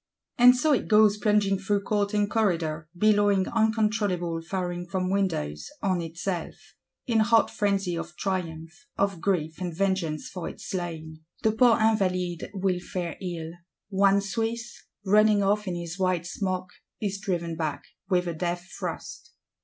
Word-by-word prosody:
And 250 +1 +8
so 300 +4 +3
it 265 - 0
goes 210 -1 +5
plunging 210 -2 +2
through 200 +1 0
court 205 0 0
and 205 -1 +2
corridor; 165 -8 0
billowing 205 -1 +3
uncontrollable, 210 -7 +1
firing 175 0 -3
from 185 0 -1
windows—on 180 - -1
itself: 170 +2 -4 0.5
in 230 -3 +2
hot 225 +1 +4
frenzy 195 -4 0
of 170 +1 -6
triumph, 175 - -4
of 195 -4 0
grief 165 -3 -1
and 180 -1 -2
vengeance 190 -6 0
for 180 -3 -5
its - - -10
slain. 160 -4 -5 0.2
The 220 - +4
poor 230 +1 +5
Invalides 185 -6 +1
will 190 -2 0
fare 175 -2 -4
ill; 170 -3 -4 0.4
one 200 0 +4
Swiss, 230 +3 -3 0.2
running 210 +1 +5
off 205 +1 +1
in 180 - -2
his 170 +1 -6
white 185 -2 +1
smock, 185 0 -3 0.3
is 200 -2 -2
driven 170 -4 -2
back, 155 -3 -3 0.3
with 180 -2 +2
a 170 - -2
death 175 +2 -3
thrust. - - -6
190 Hz, 145 wpm, -27 LUFS, 175-210 Hz, 0.5 s, And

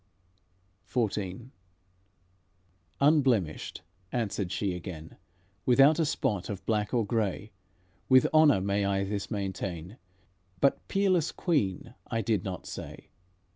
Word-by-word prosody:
XIV 110 0 -2 1.5
"Unblemished," 130 - +2 0.3
answered 100 -6 -2
she 100 -2 -1
again, 85 -3 -8 0.5
"Without 135 +5 +5
a 165 - +3
spot 100 -9 -1
of 100 -3 -6
black 105 -2 0
or 120 -3 +1
gray, 105 -2 -2 0.6
With 130 -1 +6
honour 155 -11 +6
may 100 +1 0
I 100 0 +1
this 100 0 -3
maintain; 95 -2 -4 0.6
But 140 - +2
'peerless 185 -5 +2
Queen' 115 - -1
I 115 -1 -1
did 105 -2 0
not 90 -3 -5
say. - - -8
105 Hz, 110 wpm, -29 LUFS, 95-130 Hz, 1.5 s, With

